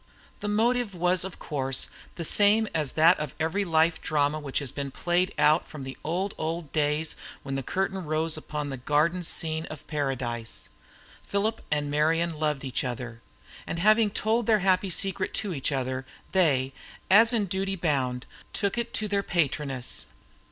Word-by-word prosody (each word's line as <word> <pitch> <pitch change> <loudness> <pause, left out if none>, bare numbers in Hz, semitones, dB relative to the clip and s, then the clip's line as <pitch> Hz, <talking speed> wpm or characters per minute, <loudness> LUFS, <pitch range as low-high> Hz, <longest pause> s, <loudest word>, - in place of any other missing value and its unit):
The 205 - -4
motive 225 0 +1
was 180 +1 +2
of 190 -1 -6
course 135 -3 -1 0.2
the 170 - -3
same 210 +5 +5
as 155 -4 0
that 165 +3 +5
of 150 -3 -4
every 165 +6 0
life 165 -2 +2
drama 150 0 +1
which 140 -3 -4
has 140 -4 -1
been 140 -1 -4
played 175 +6 0
out 150 +2 +4
from 150 -4 -8
the 130 0 -6
old, 185 +5 -1
old 160 -1 -3
days 150 +1 0 0.3
when 135 - -5
the 135 - -1
curtain 190 +6 -2
rose 155 +1 -1
upon 150 -2 -4
the 135 - -4
garden 150 +7 +1
scene 160 -1 0
of 155 - -9
Paradise. 130 -6 -3 0.5
Philip 210 +3 -1
and 145 -1 0
Marian 165 +3 +2
loved 150 -3 0
each 130 -3 -2
other, 120 -2 -5 0.5
and - - -3
having 215 +4 +4
told 220 +2 0
their 215 -3 +4
happy 190 0 +3
secret 190 +1 0
to 200 -4 -1
each 140 -1 -1
other, 130 -1 -2 0.3
they, 135 -8 +2 0.4
as 225 +4 +8
in 225 -4 +1
duty 195 +1 -1
bound, 135 -8 0 0.3
took 200 +3 0
it 235 - -2
to 215 - 0
their 200 -1 +1
patroness. 145 -8 -1
160 Hz, 170 wpm, -27 LUFS, 145-190 Hz, 0.5 s, as